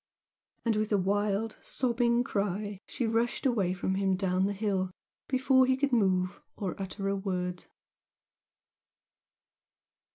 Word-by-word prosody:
And 225 -2 +2
with 215 0 -1
a 205 - +4
wild, 205 +3 0
sobbing 240 -1 +1
cry 205 -2 -2
she 245 - -2
rushed 230 +4 0
away 210 -9 +2
from 190 +1 -1
him 190 0 +1
down 185 0 +1
the 205 - -1
hill 195 -2 0 0.4
before 260 0 +4
he 260 0 +3
could 280 0 +1
move 185 -4 +2
or 195 -3 -3
utter 195 +1 -4
a 200 - +1
word. 180 -2 -3
205 Hz, 130 wpm, -30 LUFS, 190-235 Hz, 0.4 s, a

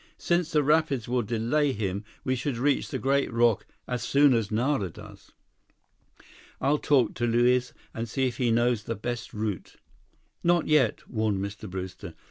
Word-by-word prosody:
Since 175 -1 0
the 150 -1 +3
rapids 145 -4 +2
will 125 0 +1
delay 120 +6 0
him, 100 -2 -3 0.2
we 130 - 0
should 130 0 -3
reach 140 +3 +1
the - - -3
great 140 0 +1
rock 115 -2 +2 0.2
as 125 -2 -2
soon 140 +3 +4
as 115 -4 0
Nara 115 -2 0
does." - - -13 1.3
"I'll 145 +3 +2
talk 130 -6 +2
to 120 0 -1
Luiz 120 +2 +2 0.2
and 115 0 -4
see 130 +4 0
if 125 - -2
he 125 -2 +1
knows 120 -1 +1
the 115 - -3
best 120 +2 -5
route—" 105 -4 -4 0.7
"Not 175 -1 +3
yet!" 150 -3 +2
warned 110 -3 0
Mr. 100 +1 -6
Brewster. 95 0 -7
120 Hz, 165 wpm, -27 LUFS, 110-140 Hz, 1.3 s, soon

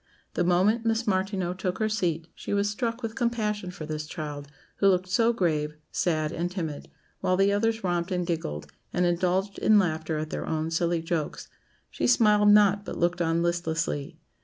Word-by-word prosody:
The - - +1
moment 190 +6 +3
Miss 225 0 +1
Martineau 190 -2 0
took 185 0 -3
her 220 - +1
seat 175 -7 -1
she - - -4
was 200 0 +2
struck 230 +3 -2
with 225 -1 -3
compassion 215 -5 -1
for 170 -3 -7
this 155 0 -4
child, 150 -3 -6 0.3
who 200 - +3
looked 185 -1 +3
so 225 +6 +3
grave, 155 -8 0 0.2
sad, 155 -3 0
and 175 +2 -2
timid, 165 -6 -5 0.3
while 185 0 +1
the 195 +1 +3
others 225 +1 0
romped 175 -1 0
and 180 -1 0
giggled, 160 - -3 0.3
and 180 - +1
indulged 180 +3 0
in 215 - +5
laughter 160 -4 0
at 155 0 -4
their - - -4
own 160 +1 -1
silly 170 0 0
jokes; 165 -2 -3 0.4
she - - -1
smiled 210 -4 +5
not, 205 -1 +5
but - - -6
looked 175 +1 +1
on 165 0 +1
listlessly. 165 -3 -2
180 Hz, 185 wpm, -27 LUFS, 165-205 Hz, 0.4 s, in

